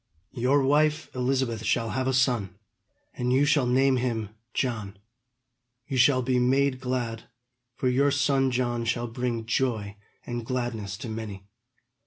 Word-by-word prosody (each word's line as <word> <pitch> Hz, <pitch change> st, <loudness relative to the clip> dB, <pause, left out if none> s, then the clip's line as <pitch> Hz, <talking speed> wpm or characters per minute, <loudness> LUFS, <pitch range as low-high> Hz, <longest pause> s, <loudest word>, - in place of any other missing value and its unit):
Your 130 Hz, +4 st, +2 dB
wife 150 Hz, +3 st, +2 dB
Elizabeth 125 Hz, -3 st, -1 dB
shall 115 Hz, 0 st, 0 dB
have 130 Hz, 0 st, -1 dB
a -, -, +2 dB
son, 120 Hz, -8 st, +1 dB, 0.6 s
and 125 Hz, 0 st, -1 dB
you 135 Hz, +3 st, +4 dB
shall 145 Hz, -3 st, +3 dB
name 130 Hz, +1 st, +3 dB
him 115 Hz, -4 st, -2 dB, 0.2 s
John. 110 Hz, -6 st, -2 dB, 0.9 s
You 135 Hz, -, -3 dB
shall 130 Hz, +1 st, +4 dB
be 125 Hz, 0 st, +1 dB
made 130 Hz, +1 st, +2 dB
glad, 125 Hz, -3 st, -3 dB, 0.5 s
for 130 Hz, -, -1 dB
your 135 Hz, +3 st, +3 dB
son 135 Hz, -1 st, +2 dB
John 120 Hz, -2 st, -1 dB
shall 120 Hz, +1 st, -1 dB
bring 120 Hz, -1 st, -3 dB
joy 110 Hz, -4 st, -1 dB, 0.3 s
and 120 Hz, -1 st, -4 dB
gladness 115 Hz, -5 st, -3 dB
to -, -, -5 dB
many. 110 Hz, -3 st, -6 dB
125 Hz, 145 wpm, -27 LUFS, 115-130 Hz, 0.9 s, you